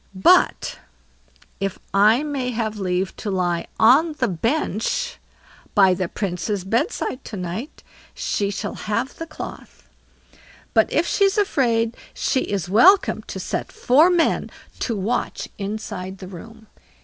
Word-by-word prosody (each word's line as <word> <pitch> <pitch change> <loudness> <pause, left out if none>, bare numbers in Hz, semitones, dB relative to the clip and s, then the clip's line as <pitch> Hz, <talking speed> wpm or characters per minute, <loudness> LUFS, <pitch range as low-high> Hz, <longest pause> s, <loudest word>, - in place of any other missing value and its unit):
"But 355 - +3 0.8
if 195 -1 -2 0.2
I 215 +7 +5
may 280 -4 -2
have 220 -3 -3
leave 185 0 -1
to 210 - -4
lie 175 -3 -1
on 280 +9 +5
the 260 -4 0
bench 230 - -1 0.6
by 190 -3 +6
the 185 -1 -2
Princess' 195 +1 -3
bed 235 - +1
side 260 - -4
to 210 - -6
night, 185 - -6 0.3
she 200 -1 -1
shall 205 +1 -4
have 230 +6 -3
the 330 - -5
cloth; 310 - -10 0.9
but - - +3
if - - +2
she's 395 0 +2
afraid, 235 - +1 0.2
she 265 - +1
is 200 -8 -2
welcome 350 - +5
to - - -6
set - - -3
four 315 - +4
men 350 -2 +2 0.3
to 230 - -1
watch 205 +5 -2
inside 195 -2 -5
the 185 - -9
room." 220 +5 -11
220 Hz, 135 wpm, -22 LUFS, 195-275 Hz, 0.9 s, by